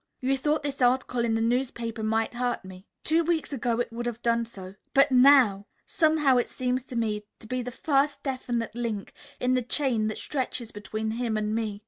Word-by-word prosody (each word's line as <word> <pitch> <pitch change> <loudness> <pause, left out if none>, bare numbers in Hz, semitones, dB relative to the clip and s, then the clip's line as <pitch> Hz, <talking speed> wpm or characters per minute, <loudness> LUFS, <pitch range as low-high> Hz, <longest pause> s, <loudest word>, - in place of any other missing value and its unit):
You 265 +1 +1
thought 295 +3 0
this 280 -2 -4
article 250 -1 +2
in 225 -1 +1
the 225 - 0
newspaper 235 -1 -1
might 225 +2 0
hurt 245 -4 -2
me. 185 +1 -12 0.2
Two 325 +2 +2
weeks 325 -3 -1
ago 235 -2 -1
it 240 -1 -2
would 240 +1 -3
have 235 0 -5
done 235 0 +2
so. 190 -4 -10 0.2
But 275 +1 +5
now! 250 -6 +6 0.2
Somehow 310 -5 +3
it 245 - +1
seems 250 0 -1
to 255 - -9
me 215 -3 0 0.2
to - - -13
be 255 +3 -2
the 250 - -5
first 280 +2 0
definite 245 -4 -2
link 230 -4 -4 0.3
in 250 0 +1
the 255 - +2
chain 240 -3 +1
that 215 - -3
stretches 255 -4 -3
between 215 +2 -4
him 230 -1 -1
and 210 0 -1
me. 220 -2 -2
240 Hz, 200 wpm, -27 LUFS, 225-265 Hz, 0.3 s, now